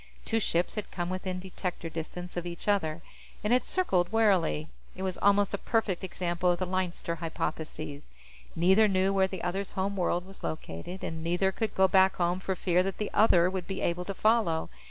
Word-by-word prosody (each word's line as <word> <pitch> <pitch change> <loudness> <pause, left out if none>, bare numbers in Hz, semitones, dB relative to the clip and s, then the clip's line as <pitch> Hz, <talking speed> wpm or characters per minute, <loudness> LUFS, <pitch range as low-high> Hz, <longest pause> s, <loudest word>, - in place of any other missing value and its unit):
Two 225 - +1
ships 175 -4 0
had 210 - -4
come 175 -1 -3
within 185 0 -3
detector 180 -2 -5
distance 170 +2 -6
of 175 0 -3
each 170 +3 -7
other, 170 -6 +1 0.4
and 210 +3 +2
had 250 - +4
circled 185 - +1
warily. 190 - +2 0.3
It 190 - -5
was 185 -2 -2
almost 205 0 +3
a 200 - -1
perfect 220 -6 0
example 180 -1 -1
of 175 - +2
the 185 - -1
Leinster 180 -2 -2
Hypothesis; 160 -3 -4 0.5
neither 190 +6 +5
knew 190 0 +2
where 190 -1 +3
the 190 -2 -6
other's 190 +3 -2
home 195 +1 -1
world 180 -1 0
was 195 0 -13
located, 155 - -5
and 160 0 -4
neither 175 +3 +1
could 220 +3 -3
go 190 0 +5
back 190 +1 +5
home 175 +1 +1
for 190 0 -2
fear 180 -1 +2
that 190 0 -2
the 210 - -3
other 180 -5 +5
would 185 -1 -3
be 195 -1 -4
able 175 +1 -1
to 195 - -4
follow. 215 - +2
185 Hz, 195 wpm, -29 LUFS, 175-195 Hz, 0.5 s, neither